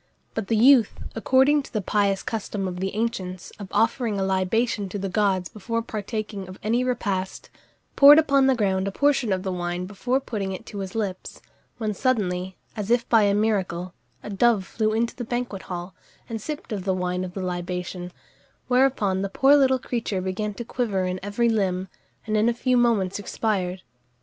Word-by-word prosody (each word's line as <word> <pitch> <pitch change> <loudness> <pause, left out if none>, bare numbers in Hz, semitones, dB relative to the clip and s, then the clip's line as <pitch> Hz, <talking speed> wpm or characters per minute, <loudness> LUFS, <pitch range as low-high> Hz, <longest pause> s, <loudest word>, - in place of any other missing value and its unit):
But 220 -3 -3
the 225 - +1
youth 245 -1 +6 0.2
according 265 +5 +3
to - - -13
the 215 - -1
pious 200 0 +1
custom 205 -3 -3
of 180 -1 -5
the 190 +2 -3
ancients, 190 -5 -3
of 200 - -7
offering 225 0 +1
a - - +1
libation 195 +2 0
to 205 - -4
the 195 0 -3
gods 190 -2 +1
before 230 +2 -3
partaking 210 -2 -5
of 185 +1 -10
any 230 +4 +1
repast 200 -7 -2 0.4
poured 285 +1 +9
upon 275 -4 +4
the 265 - +4
ground 195 -4 0
a - - -1
portion 275 -2 +2
of 185 -1 0
the 190 - -2
wine 175 0 -3
before 245 +7 -1
putting 205 -7 -4
it 185 - -8
to 205 - -7
his 190 0 -6
lips, 200 -4 -4 0.4
when 215 -3 -2
suddenly, 190 -7 -1 0.2
as 210 -2 -4
if 240 0 +2
by 225 -2 +6
a 200 -1 +3
miracle, 185 -5 0 0.3
a 210 - -6
dove 205 -1 +3
flew 215 +2 -1
into 230 +2 0
the 245 - -5
banquet 240 -4 -3
hall, 175 0 -5 0.3
and 225 -1 -5
sipped 300 +1 -6
of 200 -3 -3
the 190 -1 0
wine 180 0 -1
of 180 -1 -7
the 190 - -3
libation; 180 0 -4 0.6
whereupon 250 -7 +2
the 195 - -2
poor 270 +8 +5
little 265 -2 +4
creature 235 -6 -3
began 200 +3 -3
to 235 - -6
quiver 210 -7 -1
in 185 0 -2
every 205 +4 0
limb, 190 -4 0 0.4
and 215 -1 -1
in 215 +2 +3
a 235 - -1
few 255 +1 +1
moments 220 -6 +2
expired. 190 -3 -2
205 Hz, 190 wpm, -24 LUFS, 190-235 Hz, 0.6 s, poured